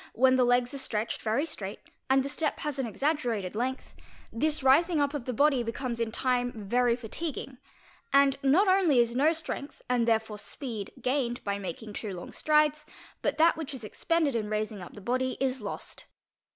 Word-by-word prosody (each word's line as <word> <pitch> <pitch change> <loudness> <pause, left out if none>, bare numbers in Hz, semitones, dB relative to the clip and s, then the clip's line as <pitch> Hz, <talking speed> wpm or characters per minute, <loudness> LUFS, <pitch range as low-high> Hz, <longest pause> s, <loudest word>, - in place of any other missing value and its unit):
when 260 +2 +4
the 255 - +4
legs 245 +1 +2
are 275 - -4
stretched 220 -3 -2
very 230 +7 +1
straight 200 -10 -6 0.3
and 265 0 +4
the - - -3
step 300 +1 -1
has 295 -2 -3
an 240 -4 -2
seg 295 +8 +1
coemca 220 -9 -2
length, 255 +4 -3 0.4
this 300 +4 0
rising 310 +5 +5
up 285 0 +1
of 285 -5 -4
the 255 - -2
body 275 +1 +3
becomes 235 +1 -3
in 230 -1 -1
time 245 +1 0
very 235 +2 +1
fatiguing, 255 +2 -5 0.5
and 275 -1 +5
not 305 +9 +4
_ 380 +1 +5
only 310 -8 +3
is 235 0 +3
no 290 +5 +4
strength, 315 -3 -5
and 245 -2 +1
therefore 220 -2 +1
speed, 225 -4 -6
gained 250 -2 0
by 200 0 -2
making 205 +3 -6
too 210 0 -4
long 175 - -8
strides, 305 0 +2 0.4
but - - 0
that 330 +2 +5
which 305 -3 -5
is 245 - -9
expended 310 +5 0
in 215 -2 -1
raising 215 -1 -2
up 175 - -10
the 205 - -10
body 255 +4 -1
is 260 -2 0
lost. 205 - -7
255 Hz, 195 wpm, -29 LUFS, 225-285 Hz, 0.5 s, rising